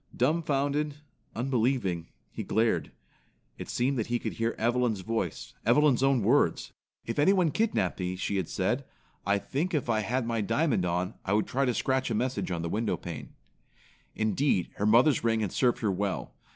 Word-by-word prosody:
Dumfounded, 145 +1 +1 0.4
unbelieving, 120 -8 0 0.2
he - - -5
glared. 110 +1 +1 0.7
It - - -7
seemed 130 +1 0
that 110 - -1
he 120 0 0
could - - -4
hear 115 0 -1
Evelyn's 120 -3 +1
voice, 100 -5 -3
Evelyn's 130 +2 +4
own 135 -4 +3
words. - - +2 0.3
"If 115 - -3
anyone 180 +1 +4
kidnapped 220 - 0
me," 90 0 -2
she 100 +2 -2
had 95 -4 -2
said, - - 0 0.4
"I 100 0 +3
think 155 - -2
if 130 -5 0
I 110 - +2
had 120 +4 -1
my 115 -1 -1
diamond 115 - +1
on 90 +4 -1
I 95 - -1
would 105 0 +2
try 135 +2 0
to 125 - +1
scratch 130 -1 0
a 115 - -1
message 125 +1 -1
on 85 -2 -2
the - - -2
window 110 +5 -1
pane." 85 -4 -8 0.8
Indeed, 110 -2 +1
her 105 - +1
mother's 120 +5 +5
ring 115 -1 +2
had 100 -4 -1
served 125 -2 +1
her 105 -3 +1
well. 95 +1 -3
115 Hz, 180 wpm, -28 LUFS, 100-135 Hz, 0.8 s, mother's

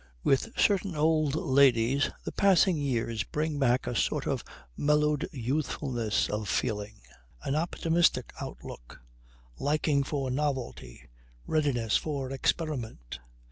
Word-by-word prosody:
With 140 +12 +1
certain 195 -3 +2
old 155 -1 +2
ladies 135 -2 +3
the - - -4
passing 195 -2 +4
years 120 -6 -1
bring 150 - -2
back 125 -2 +2
a 120 0 -3
sort - - 0
of - - -1 0.3
mellowed 150 0 +1
youthfulness 125 -3 -1
of 105 -1 -3
feeling, 105 -2 -2 0.4
an 135 - -1
optimistic 165 +1 +1
outlook, - - -9 0.6
liking 145 -1 +1
for 135 -2 -2
novelty, 130 - -3 0.4
readiness 135 -8 +1
for 140 -4 -4
experiment. 130 - -2
140 Hz, 110 wpm, -29 LUFS, 120-155 Hz, 0.6 s, passing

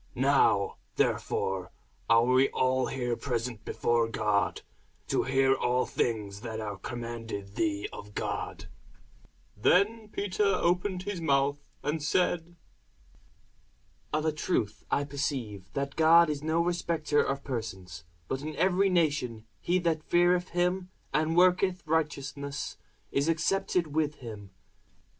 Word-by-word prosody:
Now 130 -7 +3 0.2
therefore 95 -1 0 0.4
are 115 +1 +6
we 130 +2 +4
all 130 -1 +1
here 120 -2 -1
present 120 -4 -3
before 120 -1 +1
God, 105 -3 0 0.5
to - - +2
hear 135 0 +3
all 125 -1 +1
things 105 -4 -2
that 110 -2 -5
are 105 -2 -4
commanded 115 -2 -6
thee 100 -2 0
of 105 0 -10
God. - - -3 0.9
[Sidenote: 105 - -21
The - - +5
Acts 200 +3 +5
10] 230 - -12
Then 215 -1 -17
Peter 205 0 -1
opened 185 -1 +1
his 195 -3 -4
mouth, 140 -2 +2 0.2
and 150 +2 -1
said, 175 +2 0 1.6
Of 155 +1 0
a 160 - +3
truth 150 - -1
I 145 - +1
perceive 135 -9 -4
that 140 0 -3
God 165 0 +6
is 145 -1 -4
no 160 +2 +1
respecter 170 -4 +1
of 140 0 -2
persons: 95 - -5 0.2
but 135 - -2
in 155 +1 -5
every 190 +4 +3
nation 145 -10 0
he 180 +1 +1
that 165 -3 0
feareth 175 +1 +3
him, 180 +1 0 0.2
and 155 +3 +1
worketh 185 0 +3
righteousness, 140 -3 -2 0.4
is 140 +3 +1
accepted 170 -1 0
with 150 -1 +1
him. 105 -5 -9
140 Hz, 135 wpm, -29 LUFS, 115-170 Hz, 1.6 s, are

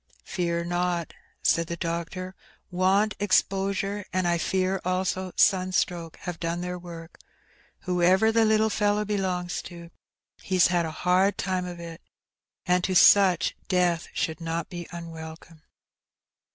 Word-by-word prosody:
Fear 170 -2 -2
not,*' 175 -1 -2 0.3
said 165 -1 +2
the 170 - -4
doctor; 170 +2 -4 0.4
"want, 190 +4 +2
exposure, 195 0 0
and 185 -1 0
I 170 -1 +1
fear 185 +2 0
also 185 0 -1
sunstroke, 185 -3 +1
have 175 -2 -6
done 170 +1 -2
their 180 0 -4
work. 170 -2 -11 0.6
Whoever 185 +4 +3
the 225 0 +3
little 220 0 +3
fellow 210 0 +1
belongs 185 -4 -2
to, 170 -1 -11 0.5
he's 185 -2 +3
had 170 -2 +1
a - - -5
hard 185 +2 +3
time 185 -1 -1
of 175 -1 -7
it, 165 0 -9 0.6
and 180 0 +2
to 185 0 0
such 185 -2 +5
death 175 -2 +1
should 160 -1 -3
not 165 0 -3
be 175 -1 -6
unwelcome.'' 165 -1 -9
180 Hz, 135 wpm, -26 LUFS, 170-190 Hz, 0.6 s, such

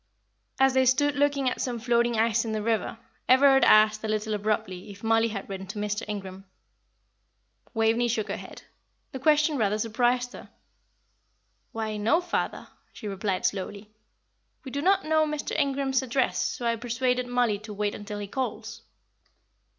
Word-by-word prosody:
As 270 0 +4
they 260 0 +3
stood 290 +3 +3
looking 285 -2 +1
at 250 - -1
some 245 -2 -2
floating 235 0 +1
ice 225 0 +2
in 225 -2 -3
the 215 -1 -2
river, 225 0 -1 0.3
Everard 270 0 +6
asked 215 -1 +5
a - - -2
little 215 0 -1
abruptly 205 -3 -2
if 200 +1 -12
Mollie 225 0 +3
had 210 -3 -5
written 195 -1 -6
to 205 - -7
Mr. 210 +1 -2
Ingram. 195 -2 -6 1.3
Waveney 225 +2 +2
shook 220 -2 -1
her - - -2
head. - - -11 0.5
The 265 - -6
question 300 +1 +3
rather 210 -1 +1
surprised 245 +3 0
her. - - -11 1.2
"Why, 220 -1 -3
no, 225 +11 +3
father," 360 - -3 0.2
she 215 - -8
replied, 195 -1 -2
slowly; 200 +2 -3 0.7
"we 265 - -8
do 280 - -2
not 385 +4 +3
know 310 0 +2
Mr. 300 -1 -3
Ingram's 270 -2 +1
address, 260 0 0
so 240 - -3
I 230 0 +1
persuaded 250 +2 -1
Mollie 245 -4 +1
to 215 +1 -10
wait 205 0 -2
until 210 0 -7
he 205 - -4
calls." 260 +6 -5
230 Hz, 165 wpm, -27 LUFS, 210-260 Hz, 1.3 s, Everard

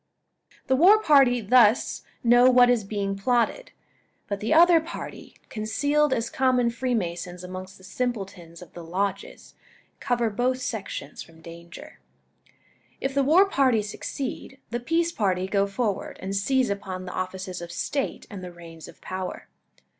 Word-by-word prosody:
The 265 - +2
war 380 +10 +6
party 275 - +4
thus 225 +1 +3 0.2
know 245 +1 +6
what 245 -1 +6
is 235 -3 +1
being 200 -1 -3
plotted. 245 - 0 0.6
But 200 -1 -3
the 215 - -3
other 335 +1 +7
party, 325 - -9
concealed 285 +7 0
as 230 -2 0
common 250 -2 +1
Freemasons 180 -8 -3
amongst 185 +1 -8
the 190 - -19
simpletons 195 -7 -5
of - - -18
the 175 - -9
lodges, 195 +4 -4 0.5
cover 240 -4 0
both 250 +4 0
sections 210 - -5
from 165 -1 -14
danger. 170 0 -12 1.0
If 270 - -2
the 280 - +2
war 345 +8 +5
party 260 - +2
succeed, 265 +5 -6
the 240 - -2
peace 330 +7 0
party 185 - 0
go 200 +1 +1
forward 205 0 -3
and 195 +1 -4
seize 255 +3 +1
upon 190 -2 -5
the 180 - -7
offices 185 -1 -5
of 170 0 -8
state 280 -2 -3
and 195 -3 -8
the 180 - -7
reins 165 -2 -12
of - - -15
power. 185 0 -6
215 Hz, 150 wpm, -25 LUFS, 185-255 Hz, 1.0 s, other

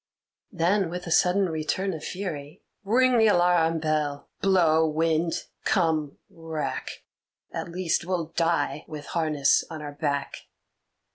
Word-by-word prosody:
Then, 185 0 +1
with 180 +2 -5
a 165 - -5
sudden 185 +3 +3
return 170 +4 -2
of 155 - -7
fury, 155 -7 -6 0.2
"Ring 245 +4 +3
the 220 - +5
alarum 175 -4 +3
bell! 155 -2 -1
Blow, 170 -5 +4
wind! 160 +1 0 0.2
come, 160 -6 +1
wrack! 160 -2 -5 0.5
At - - -4
least 175 -1 -1
we'll 175 -2 -1
die 160 -4 0
with 150 -2 -8
harness 155 -5 +2
on 160 - -6
our 145 -1 -6
back!" 145 -2 -3
165 Hz, 130 wpm, -26 LUFS, 155-180 Hz, 0.5 s, the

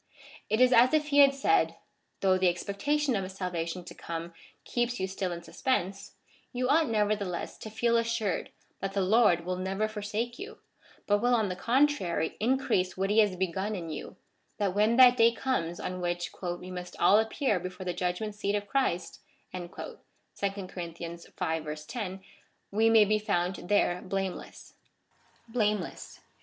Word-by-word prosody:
It 220 - +1
is 255 0 +6
as 250 +6 +6
if 300 -1 0
he 285 0 +4
had 280 -1 +8
said 400 +9 +2 0.2
— - - -47
Though 190 -1 +4
the 185 -1 +4
expecta 200 +12 -1
tion 290 -5 +1
of 195 - -1
a 185 - -5
salvation 180 -2 -4
to - - -10
come 170 0 -6 0.3
keeps 240 0 -1
you 190 - -1
still 190 -1 -3
in 170 0 -6
suspense, 195 -4 -2 0.4
you 250 0 -1
ought 315 0 +3
nevertheless 210 -4 -1
to 220 - -7
feel 235 +2 +1
assured 230 -4 -1 0.3
that 195 0 -3
the 200 - +1
Lord 185 -4 +4
will 180 0 -2
never 195 +3 -1
forsake 215 +4 -4
you, 430 +3 -8 0.5
but 205 0 +3
will 245 +2 +3
on 220 -4 +1
the 180 - -3
contrary 235 - +1
increase 220 -7 +1
what 195 +1 0
he 215 - +4
has 205 -4 +4
begun 190 +3 -2
in 165 -4 -5
you, 150 - -7 0.4
that 200 -3 0
when 210 +3 +3
that 250 0 +8
day 230 0 +6
comes 175 -11 -2
on 185 0 -4
which 175 0 -2
" - - -24 0.2
we 185 +1 -9
must 180 -1 -7
all 205 - +6
appear 220 -1 0
before 185 +1 -7
the 180 - -1
judgment 180 +4 -2
seat 205 -1 -1
of 205 0 -2
Christ," 200 -11 -1 0.3
(2 175 -1 -5
Cor. 175 - -9 0.4
v. 170 -4 -4
10,) 195 -2 -5 0.5
we 220 +3 +3
may 225 -2 +7
be 215 +1 +2
found 180 -3 0
there 180 -3 +2
blameless. 195 -1 -5 0.7
Blameless. 210 -6 -2
200 Hz, 175 wpm, -29 LUFS, 180-230 Hz, 0.7 s, had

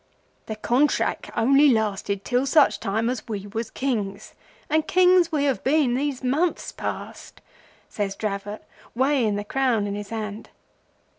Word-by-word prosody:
"'The 220 - -4
Contrack 250 +7 +1
only 275 +5 +5
lasted 205 -4 0
till 250 +2 +1
such 295 0 +4
time 225 +2 -1
as 250 -1 -3
we 205 -3 -4
was 220 +2 -4
Kings; 210 -7 -3 0.3
and 315 -1 +1
Kings 360 -1 +4
we 300 -3 +1
have 275 -2 0
been 275 -2 +2
these 270 0 -2
months 300 +7 0
past,' - - -7 0.5
says 200 -2 -3
Dravot, 205 0 -4 0.3
weighing 255 -5 +2
his 205 - -4
crown 250 -5 +1
in 200 - -3
his 205 0 -6
hand. 215 -1 -5
240 Hz, 145 wpm, -24 LUFS, 205-275 Hz, 0.5 s, only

